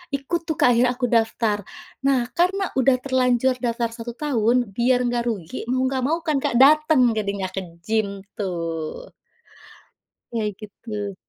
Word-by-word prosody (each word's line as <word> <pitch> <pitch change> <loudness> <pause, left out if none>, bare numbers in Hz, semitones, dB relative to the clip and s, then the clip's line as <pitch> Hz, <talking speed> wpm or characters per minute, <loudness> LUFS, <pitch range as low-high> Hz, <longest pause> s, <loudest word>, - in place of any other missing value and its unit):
ikut 320 +5 -2
tuh 315 - -1
Kak - - +5
akhirnya 245 +1 +3
aku 245 -1 -1
daftar 225 -2 +1 0.5
nah 255 -3 +2
karena 385 +3 +2 0.2
udah 260 0 +4
terlanjur 255 -1 +2
daftar 235 0 -1
1 240 0 -6
tahun 245 -5 +1
biar 245 +2 +3
enggak 240 -1 0
rugi 195 0 -5
mau 255 0 +1
nggak 260 -1 -1
mau 325 +3 0
kan, 310 -3 +1
Kak, - - 0
dateng 305 0 +6 0.2
jadinya 200 -2 -2
ke 190 - -1 0.2
gym 210 -1 -1 0.2
tuh. 165 -5 -4 1.2
Iya 225 -2 -1
gitu. 210 -1 -6
240 Hz, 150 wpm, -23 LUFS, 210-260 Hz, 1.2 s, dateng